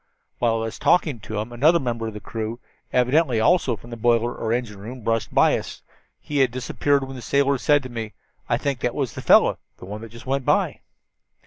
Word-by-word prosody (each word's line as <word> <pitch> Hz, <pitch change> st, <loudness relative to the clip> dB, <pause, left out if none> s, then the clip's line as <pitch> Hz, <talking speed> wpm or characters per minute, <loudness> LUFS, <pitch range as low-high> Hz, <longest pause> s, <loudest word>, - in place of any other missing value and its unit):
"While 115 Hz, -2 st, +2 dB
I 115 Hz, 0 st, -1 dB
was 115 Hz, -, -6 dB
talking 155 Hz, -8 st, +2 dB
to 110 Hz, +1 st, -6 dB
him 110 Hz, +3 st, -5 dB
another 155 Hz, +8 st, +4 dB
member 115 Hz, -4 st, -3 dB
of 110 Hz, -, -7 dB
the -, -, -5 dB
crew, 110 Hz, +2 st, -5 dB, 0.3 s
evidently 125 Hz, 0 st, +2 dB
also 135 Hz, -1 st, +3 dB
from 120 Hz, +3 st, -14 dB
the -, -, -4 dB
boiler 120 Hz, +1 st, +2 dB
or 110 Hz, -, -3 dB
engine 115 Hz, -4 st, -2 dB
room, 120 Hz, +5 st, -8 dB
brushed 115 Hz, +1 st, -1 dB
by -, -, +4 dB
us. -, -, -6 dB, 0.4 s
He 145 Hz, -1 st, -3 dB
had 135 Hz, -2 st, +4 dB
disappeared 135 Hz, +3 st, 0 dB
when 135 Hz, 0 st, -8 dB
the 125 Hz, -, -8 dB
sailor 140 Hz, +2 st, +1 dB
said 145 Hz, +2 st, +3 dB
to 130 Hz, -, -7 dB
me, 115 Hz, -3 st, -5 dB, 0.4 s
'I -, -, +2 dB
think 140 Hz, -3 st, -2 dB
that 125 Hz, -, -1 dB
was 135 Hz, -6 st, -2 dB
the -, -, -6 dB
fellow -, -, +5 dB, 0.2 s
the -, -, -11 dB
one 105 Hz, +3 st, -7 dB
that 115 Hz, -, -9 dB
just 115 Hz, +1 st, -13 dB
went 135 Hz, +1 st, -1 dB
by.' -, -, +1 dB
120 Hz, 225 wpm, -23 LUFS, 115-135 Hz, 0.4 s, fellow